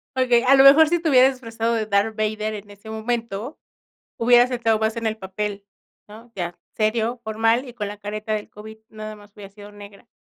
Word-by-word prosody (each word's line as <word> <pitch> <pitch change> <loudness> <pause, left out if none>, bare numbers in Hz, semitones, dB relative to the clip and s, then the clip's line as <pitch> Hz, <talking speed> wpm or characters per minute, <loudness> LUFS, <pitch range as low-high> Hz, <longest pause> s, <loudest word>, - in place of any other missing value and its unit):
Okey, 250 -2 +3
a 270 +2 +6
lo 270 0 +6
mejor 300 +3 +8
si 345 +1 +1
te 330 -1 -1
hubieras 260 -1 +6
disfrazado 230 -2 -3
de 225 -2 -1
Darth 210 +1 0
Vader 215 0 -2
en 205 0 -10
ese 205 +2 -13
momento, 225 +2 -4 0.6
hubieras 245 +1 +5
entrado 230 -3 +1
más 220 +1 -1
en 230 -1 -3
el 220 - -4
papel 200 0 -5 0.4
¿no? 225 +3 -14
Ya, 175 -2 -4 0.2
serio, 225 +2 0
formal 225 +4 +1
y 245 - -11
con 210 -4 -4
la 205 - -8
careta 215 +1 -5
del 210 -1 -5
COVID, 220 +1 -12
nada 215 0 -8
más 205 -1 -18
hubiera 200 -2 -12
sido 205 0 -13
negra. 205 +2 -14
220 Hz, 205 wpm, -22 LUFS, 210-240 Hz, 0.6 s, mejor